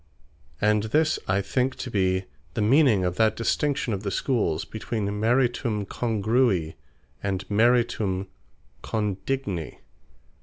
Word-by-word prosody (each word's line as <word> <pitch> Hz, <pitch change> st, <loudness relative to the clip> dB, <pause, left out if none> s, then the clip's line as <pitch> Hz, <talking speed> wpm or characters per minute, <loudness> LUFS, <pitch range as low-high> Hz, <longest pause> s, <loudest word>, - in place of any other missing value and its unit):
And 105 Hz, 0 st, +3 dB
this 155 Hz, +8 st, +2 dB
I 95 Hz, +1 st, +2 dB
think 130 Hz, +6 st, 0 dB
to 125 Hz, -, -6 dB
be 95 Hz, -2 st, +1 dB, 0.3 s
the -, -, 0 dB
meaning 115 Hz, -5 st, +4 dB
of 90 Hz, 0 st, -2 dB
that 110 Hz, -1 st, +3 dB
distinction 135 Hz, +1 st, 0 dB
of 95 Hz, -, -3 dB
the 100 Hz, -, -3 dB
Schooles, 105 Hz, -, 0 dB
between 110 Hz, -1 st, -3 dB
Meritum 120 Hz, -2 st, +1 dB
Congrui, 110 Hz, -6 st, +1 dB, 0.5 s
and 95 Hz, -1 st, -3 dB
Meritum 110 Hz, -4 st, +2 dB, 0.6 s
Condigni. 105 Hz, -, -3 dB
110 Hz, 115 wpm, -25 LUFS, 95-125 Hz, 0.6 s, meaning